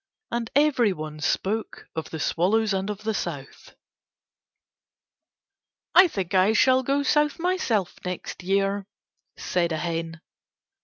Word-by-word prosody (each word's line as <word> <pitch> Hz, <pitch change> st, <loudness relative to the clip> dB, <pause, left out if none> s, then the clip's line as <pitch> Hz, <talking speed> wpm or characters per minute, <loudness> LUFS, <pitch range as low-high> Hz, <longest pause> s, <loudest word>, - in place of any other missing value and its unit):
And 235 Hz, -1 st, -2 dB
everyone 210 Hz, -, +1 dB
spoke 200 Hz, +7 st, -2 dB
of 160 Hz, -, -4 dB
the 160 Hz, -, -6 dB
swallows 205 Hz, +8 st, +1 dB
and 190 Hz, +1 st, -2 dB
the 215 Hz, +2 st, -3 dB
South. 145 Hz, -9 st, -6 dB, 2.2 s
"I 365 Hz, 0 st, +8 dB
think 195 Hz, -, -4 dB
I 190 Hz, +3 st, +4 dB
shall 260 Hz, +3 st, +4 dB
go 275 Hz, +2 st, 0 dB
South 295 Hz, 0 st, +2 dB
myself 330 Hz, -, -1 dB
next 180 Hz, 0 st, -5 dB
year," 195 Hz, +1 st, 0 dB, 0.5 s
said 170 Hz, -2 st, -1 dB
a 160 Hz, -, -1 dB
hen. 165 Hz, 0 st, -3 dB
195 Hz, 115 wpm, -25 LUFS, 175-240 Hz, 2.2 s, I